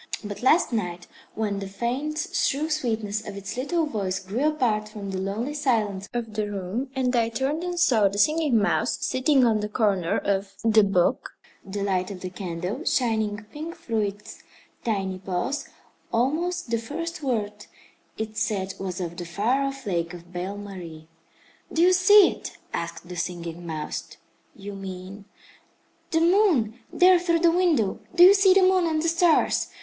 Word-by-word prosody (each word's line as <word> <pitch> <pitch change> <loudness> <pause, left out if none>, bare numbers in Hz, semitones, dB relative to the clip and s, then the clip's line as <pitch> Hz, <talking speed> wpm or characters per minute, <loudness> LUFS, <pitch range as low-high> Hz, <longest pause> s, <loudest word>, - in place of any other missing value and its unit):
But 205 -1 -6
last 260 +1 +3
night 180 -5 -2 0.3
when 205 -2 -1
the 195 - -5
faint, 250 +10 -3 0.2
shrill 300 +3 0
sweetness 220 -7 -2
of 200 -1 -6
its 195 +2 -6
little 315 +6 0
voice 195 -9 -2
grew 210 +10 -1
apart 230 -9 0
from 205 -2 -7
the 190 - -3
lonely 210 +9 -3
silence 215 -9 0
of 230 -2 -4
the 210 -1 -2
room, 200 +7 -3
and 255 -1 +1
I 230 -1 +2
turned 270 +8 -2
and 355 -1 -3
saw 235 - +4
the 200 +1 -4
Singing 305 +2 +3
Mouse 220 +3 +1
sitting 260 0 +3
on 220 -2 +3
the 210 0 -3
corner 200 -6 +1
of 195 0 -1
the 220 -1 +5
book, 190 -3 +1 0.3
the 200 +1 -4
light 185 -1 0
of 190 -3 -8
the 185 - -5
candle 180 +1 -4
shining 220 -4 0
pink 320 +5 -7
through 225 -2 -2
its 205 0 -5 0.4
tiny 195 -4 -2
paws, 190 - -3 0.4
almost 315 +5 0
the 230 - +1
first 330 +8 -5
word 210 -6 -2 0.5
it 215 0 -5
said 190 -2 -1
was 185 -2 -4
of 170 -1 -5
the 175 - -5
far 215 +10 0
off 275 -1 -3
Lake 170 -3 -2
of 175 +1 -14
Belle 185 +3 -4
Marie. 175 -6 -9 0.6
"Do 330 - +2
you 365 +1 +6
see 375 +2 +7
it?" - - -9 0.2
asked 170 +1 -5
the 180 - -7
Singing 170 -1 -5
Mouse. 155 -2 -5 0.4
"You 200 0 -8
mean 195 +1 -8 0.5
" - - -39
"The 325 - +1
moon 335 - +3
there 365 0 +6
through 340 -2 +1
the 340 -1 +5
window? 330 - +2 0.2
Do 345 - +8
you 375 +2 +10
see 390 -1 +5
the 390 - +6
moon 370 -2 +4
and 315 -1 0
the - - +1
stars? 335 0 +3
220 Hz, 175 wpm, -25 LUFS, 195-295 Hz, 0.6 s, you